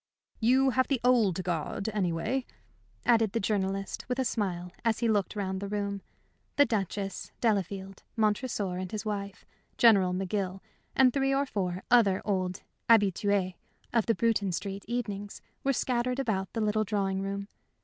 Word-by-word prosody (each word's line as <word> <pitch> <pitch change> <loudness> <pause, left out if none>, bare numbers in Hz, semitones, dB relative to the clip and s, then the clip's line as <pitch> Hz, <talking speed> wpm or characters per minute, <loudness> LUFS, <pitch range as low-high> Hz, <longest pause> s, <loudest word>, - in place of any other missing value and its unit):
"You 260 +4 +4
have 260 +1 +2
the 275 -3 +1
old 220 -8 +3
guard, 175 +3 -2
anyway," 210 +6 -1 0.6
added 225 -4 +4
the 230 - +1
journalist, 195 -1 -1
with 250 - 0
a 260 - +1
smile, 180 -6 -2
as 230 -2 +2
he 235 - 0
looked 210 -2 +1
round 190 -2 -2
the 200 - -3
room. 200 -1 -2 0.5
The 285 - +6
Duchess, 200 -3 -3
Delafield, 195 -3 -1 0.2
Montresor 210 -3 0
and 185 -1 -4
his 215 0 -4
wife, 200 -2 -4 0.3
General 200 -6 +6
McGill, 190 0 -2 0.4
and 255 -2 +5
three 270 -1 +2
or 280 +1 +2
four 185 -7 -3
other 210 -6 +5
old 185 -3 -1 0.3
habitués 200 -3 +3 0.4
of 230 -3 +2
the 230 - +3
Bruton 220 -5 +1
Street 195 +3 -4
evenings 205 -4 -4 0.2
were 275 - +3
scattered 250 -1 0
about 205 -8 -1
the 225 - -1
little 215 0 +2
drawing 195 -2 -1
room. 200 0 -3
205 Hz, 155 wpm, -29 LUFS, 190-230 Hz, 0.6 s, The